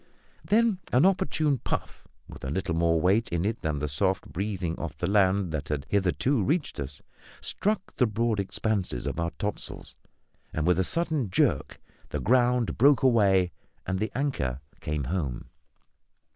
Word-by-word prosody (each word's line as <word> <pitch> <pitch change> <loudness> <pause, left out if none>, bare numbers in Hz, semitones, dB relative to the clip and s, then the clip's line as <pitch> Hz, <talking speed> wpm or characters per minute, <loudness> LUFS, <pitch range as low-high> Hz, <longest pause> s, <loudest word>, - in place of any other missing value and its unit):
Then 220 -3 +3
an 130 +7 +5
opportune 150 -7 +2
puff, - - -4 0.2
with - - -12
a 65 - -3
little 90 +3 -1
more 85 0 +2
weight 100 +7 +2
in 85 +2 -1
it 110 +2 -1
than 80 -2 -1
the 75 +1 -2
soft 95 +7 0
breathing 95 -3 -2
off 75 -3 -5
the 85 - -2
land 95 -2 +3
that 75 -3 -3
had 75 -2 -2
hitherto 100 - +1
reached 150 - -1
us, 70 +1 -6 0.4
struck 210 -1 -2
the 125 - +4
broad 110 0 0
expanses 95 - -1
of - - -3
our 85 0 0
topsails, 105 -1 -5 0.6
and, 80 - -1
with 90 0 +3
a - - +4
sudden 155 - -1
jerk, 90 - +1 0.3
the - - -3
ground 125 0 +2
broke 140 +2 +5
away 100 -8 +4 0.3
and 95 0 -1
the 110 - -1
anchor 120 - -1 0.2
came 75 -1 -2
home. 70 -4 -3
95 Hz, 160 wpm, -27 LUFS, 85-125 Hz, 0.6 s, an